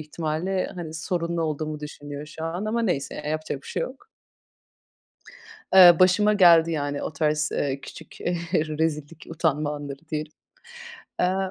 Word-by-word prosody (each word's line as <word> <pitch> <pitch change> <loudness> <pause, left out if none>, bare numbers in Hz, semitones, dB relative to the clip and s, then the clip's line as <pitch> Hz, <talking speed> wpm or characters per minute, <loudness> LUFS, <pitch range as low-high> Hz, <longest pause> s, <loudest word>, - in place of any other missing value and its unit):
ihtimalle, 160 +4 -2
hani, 165 -3 -7
sorunlu 170 0 -2
olduğumu 155 -1 -3
düşünüyor 145 0 -8
şu 160 +1 -7
an 175 +5 -3
ama 230 +2 -1
neyse, 145 -10 -1
ya, - - -6
yapacak 155 -3 -3
bir - - -14
şey - - -2
yok. 270 +11 -8 1.7
Eee, 180 -3 +9
başıma 195 +3 +5
geldi 170 -4 +6
yani 145 -2 -2
o - - -4
tarz, 150 0 0
eee, 140 -1 -1
küçük, - - -12
eee, 175 - -1 0.2
rezillik, 155 -1 -1
utanma 155 -2 0
anları 145 -1 -7
diyelim. 155 0 -3 0.9
Aaa 190 +1 +1
160 Hz, 145 wpm, -25 LUFS, 150-175 Hz, 1.7 s, Eee